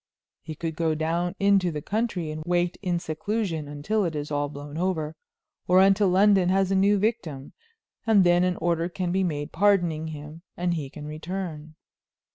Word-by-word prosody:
He 160 Hz, -2 st, -7 dB
could 160 Hz, 0 st, -4 dB
go 160 Hz, -1 st, 0 dB
down 170 Hz, +4 st, -1 dB
into 200 Hz, -3 st, +3 dB
the 150 Hz, -2 st, -5 dB
country 205 Hz, -7 st, -2 dB
and 155 Hz, 0 st, -5 dB
wait 175 Hz, +1 st, 0 dB
in 180 Hz, -3 st, 0 dB
seclusion 170 Hz, -1 st, -3 dB
until 150 Hz, +10 st, -1 dB
it 165 Hz, -4 st, -2 dB
is 150 Hz, 0 st, -4 dB
all 145 Hz, 0 st, 0 dB
blown 145 Hz, 0 st, -9 dB
over, 160 Hz, -3 st, -1 dB, 0.5 s
or 180 Hz, +1 st, +5 dB
until 195 Hz, +1 st, +5 dB
London 190 Hz, -1 st, +4 dB
has 190 Hz, 0 st, +2 dB
a -, -, +2 dB
new 200 Hz, +2 st, +4 dB
victim, 190 Hz, -, -2 dB, 0.5 s
and 210 Hz, -4 st, +6 dB
then 175 Hz, 0 st, +4 dB
an 180 Hz, 0 st, +1 dB
order 170 Hz, 0 st, 0 dB
can 180 Hz, -1 st, -3 dB
be 190 Hz, +1 st, +1 dB
made 145 Hz, -5 st, -3 dB
pardoning 175 Hz, -5 st, +2 dB
him, 155 Hz, +1 st, -8 dB, 0.2 s
and 175 Hz, 0 st, 0 dB
he 150 Hz, -5 st, -4 dB
can 150 Hz, +2 st, -9 dB
return." 155 Hz, 0 st, -6 dB
175 Hz, 180 wpm, -26 LUFS, 155-190 Hz, 0.5 s, and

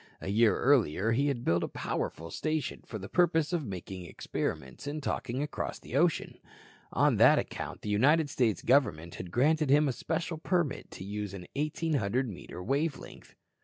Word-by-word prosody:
A -, -, -5 dB
year 110 Hz, -1 st, +4 dB
earlier 115 Hz, -, +3 dB
he 140 Hz, +5 st, +2 dB
had 130 Hz, -4 st, -1 dB
built 85 Hz, +1 st, +3 dB
a -, -, -1 dB
powerful 80 Hz, +1 st, -4 dB
station 155 Hz, -, -2 dB
for 110 Hz, -, -5 dB
the 100 Hz, -1 st, -7 dB
purpose 165 Hz, 0 st, +2 dB
of 170 Hz, -3 st, 0 dB
making 90 Hz, -1 st, -6 dB
experiments 65 Hz, -, -4 dB
in 150 Hz, +2 st, -3 dB
talking 135 Hz, -1 st, -2 dB
across 150 Hz, -, -4 dB
the -, -, -8 dB
ocean. 165 Hz, +3 st, +1 dB, 0.5 s
On -, -, +3 dB
that -, -, +7 dB
account -, -, -4 dB
the 105 Hz, -, -4 dB
United 145 Hz, +10 st, +4 dB
States 120 Hz, -6 st, 0 dB
Government 85 Hz, -, +2 dB
had 90 Hz, -, -7 dB
granted 150 Hz, -, +2 dB
him 150 Hz, +2 st, +5 dB
a 135 Hz, -, 0 dB
special 160 Hz, +3 st, -3 dB
permit 170 Hz, -4 st, -1 dB
to -, -, -9 dB
use 100 Hz, 0 st, -4 dB
an 90 Hz, -2 st, -8 dB
1,800 140 Hz, -5 st, 0 dB
metre 90 Hz, -3 st, -8 dB
wave 140 Hz, -, 0 dB
length. -, -, -13 dB
130 Hz, 175 wpm, -30 LUFS, 100-155 Hz, 0.5 s, that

